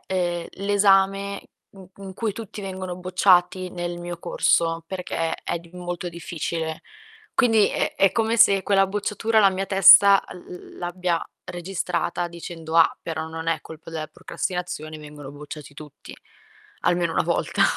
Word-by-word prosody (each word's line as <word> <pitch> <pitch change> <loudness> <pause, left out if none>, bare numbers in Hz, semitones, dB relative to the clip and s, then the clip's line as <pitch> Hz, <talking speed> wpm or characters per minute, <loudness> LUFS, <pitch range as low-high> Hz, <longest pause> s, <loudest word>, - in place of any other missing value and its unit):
ehm, 175 -2 -1 0.2
l'esame 200 -1 +3 0.4
in 190 -2 -13
in 190 -1 -9
cui 220 -1 -2
tutti 215 -1 -8
vengono 185 -2 -5
bocciati 185 0 +2
nel 175 -1 -5
mio 175 0 -6
corso 165 -1 +1
perché 175 -3 -3
è 170 - -4
di 170 - -18
molto 175 0 -5
difficile. 165 -1 -4 0.5
Quindi 225 -5 +4
è - - -2
è 195 -2 +4
come 225 +1 +1
se 200 -4 +5
quella 195 -1 +3
bocciatura 210 +3 0
la 195 - +6
mia 190 +1 -3
testa 195 +1 +8
l - - -11 0.4
l - - -14
l'abbia 175 -1 -2 0.2
registrata, 175 -1 -3
dicendo: 165 -1 -6
"Ah, 165 - +5
però 160 -1 -4
non 160 0 -5
è 165 -1 0
colpa 160 +1 -12
della 160 -1 -4
procrastinazione, 155 -1 -5
vengono 150 -2 -10
bocciati 145 0 -10
tutti 150 -1 -12 0.7
almeno 175 -1 +1
1 - - +1
volta". - - 0
175 Hz, 150 wpm, -23 LUFS, 165-195 Hz, 0.7 s, testa